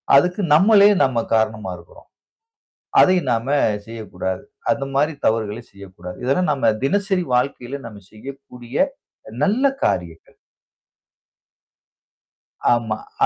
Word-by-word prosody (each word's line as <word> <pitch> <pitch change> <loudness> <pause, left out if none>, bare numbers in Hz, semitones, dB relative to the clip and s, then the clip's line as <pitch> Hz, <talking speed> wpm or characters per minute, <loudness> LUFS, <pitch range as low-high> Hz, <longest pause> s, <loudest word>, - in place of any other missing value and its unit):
அதுக்கு, 180 +7 +3
நம்மளே 200 +5 +6
நம்ம 125 -4 +1
காரணமா 110 -3 -1
இருக்குறோம். 85 0 -17 0.9
அதையும் 180 -7 +4
நாம 115 +2 -2 0.4
செய்யக்கூடாது. 110 -4 -5 0.3
அந்த 140 -1 -1
மாதிரி 150 +3 +2
தவறுகளை 110 0 0
செய்யக்கூடாது. 95 -2 -11
இதெல்லாம் 140 +7 +1
நாம 135 -6 +2
தினசரி 195 +4 +1
வாழ்க்கையில 125 +1 -2
நாம 105 -3 -12
செய்யக்கூடிய 125 +1 -11 0.7
நல்ல 215 +7 +1 0.2
காரியங்கள். 85 -3 -3 2.4
ஆமா. 115 -2 -1 0.3
அ - - +7
125 Hz, 100 wpm, -21 LUFS, 110-150 Hz, 2.4 s, அ